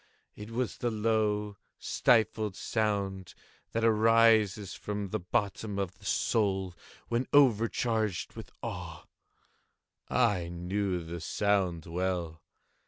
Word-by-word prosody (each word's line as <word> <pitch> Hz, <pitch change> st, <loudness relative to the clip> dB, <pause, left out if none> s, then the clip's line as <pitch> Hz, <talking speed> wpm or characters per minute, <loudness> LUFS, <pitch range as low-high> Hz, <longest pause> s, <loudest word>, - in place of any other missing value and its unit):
—it 105 Hz, +1 st, -9 dB
was 120 Hz, +1 st, -2 dB
the 120 Hz, -, 0 dB
low 105 Hz, -2 st, 0 dB, 0.2 s
stifled 110 Hz, -4 st, +2 dB
sound 100 Hz, -4 st, -2 dB, 0.4 s
that 115 Hz, -, -1 dB
arises 110 Hz, -3 st, +4 dB
from 105 Hz, -1 st, -4 dB
the -, -, -2 dB
bottom 100 Hz, +3 st, -2 dB
of 95 Hz, -2 st, -3 dB
the -, -, -16 dB
soul 95 Hz, -4 st, +1 dB, 0.4 s
when 120 Hz, +2 st, 0 dB
overcharged 115 Hz, -, +2 dB
with -, -, -10 dB
awe. -, -, -6 dB, 1.0 s
I 105 Hz, -9 st, +2 dB
knew 90 Hz, +1 st, -2 dB
the 85 Hz, +1 st, -6 dB
sound 95 Hz, -2 st, 0 dB
well. 85 Hz, -2 st, -2 dB
105 Hz, 105 wpm, -30 LUFS, 95-110 Hz, 1.0 s, arises